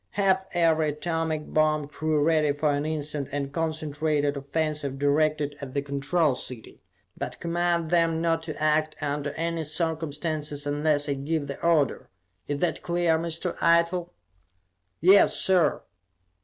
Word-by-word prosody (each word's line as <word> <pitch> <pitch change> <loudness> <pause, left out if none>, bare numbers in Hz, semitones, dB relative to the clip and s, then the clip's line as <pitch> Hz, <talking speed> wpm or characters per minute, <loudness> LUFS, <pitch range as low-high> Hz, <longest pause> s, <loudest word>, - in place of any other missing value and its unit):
Have 190 -1 +2
every 160 -2 +3
atomic 160 0 -2
bomb 155 -1 +2
crew 155 0 0
ready 155 -2 +3
for 145 +1 +1
an 145 +2 -1
instant 150 -2 -3
and 140 -1 -3
concentrated 155 -2 -1
offensive 140 0 -2
directed 145 +1 +1
at 135 -1 -8
the 140 - +1
Control 140 +2 +1
City, 125 -2 -6 0.3
but - - -5
command 170 -1 0
them 165 -2 +2
not 165 0 +1
to 155 - -6
act 155 0 +1
under 145 0 -2
any 165 0 -2
circumstances 155 -2 -3
unless 145 0 +1
I 140 - +1
give 145 +2 -2
the 140 0 -7
order. 165 -5 +1 0.4
Is 145 0 -2
that 175 - 0
clear, 170 -2 +1
Mr. 170 +2 -3
Eitel?" 170 +1 +3 0.9
"Yes, 190 +4 +6
sir!" 180 -5 +2
155 Hz, 140 wpm, -26 LUFS, 145-165 Hz, 0.9 s, Yes